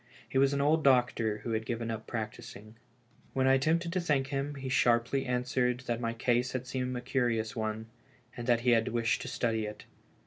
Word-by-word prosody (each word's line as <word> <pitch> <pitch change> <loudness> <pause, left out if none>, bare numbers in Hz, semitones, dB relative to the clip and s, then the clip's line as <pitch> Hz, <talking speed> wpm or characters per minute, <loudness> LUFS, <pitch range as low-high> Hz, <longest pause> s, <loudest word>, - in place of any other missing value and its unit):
He 135 - 0
was 135 0 +4
an 140 0 0
old 155 +2 +3
doctor 120 -5 +2
who 120 - -3
had 110 0 0
given 115 0 -3
up 110 0 -6
practising. 110 -1 -6 0.6
When 130 0 +1
I 130 - +5
attempted 165 +5 +1
to 185 - 0
thank 140 -5 +1
him, 140 +1 -2
he 135 -1 -6
sharply 125 0 +2
answered 125 0 0
that 120 -2 -3
my 115 -1 -1
case 120 +2 0
had 130 -1 -3
seemed 125 0 -3
a - - -4
curious 120 -4 0
one, 110 0 -3 0.5
and 120 0 -6
that 120 -1 +3
he 125 0 +3
had 115 -1 +3
wished 115 0 0
to - - -6
study 110 -3 -1
it. 105 0 -9
125 Hz, 205 wpm, -30 LUFS, 115-135 Hz, 0.6 s, I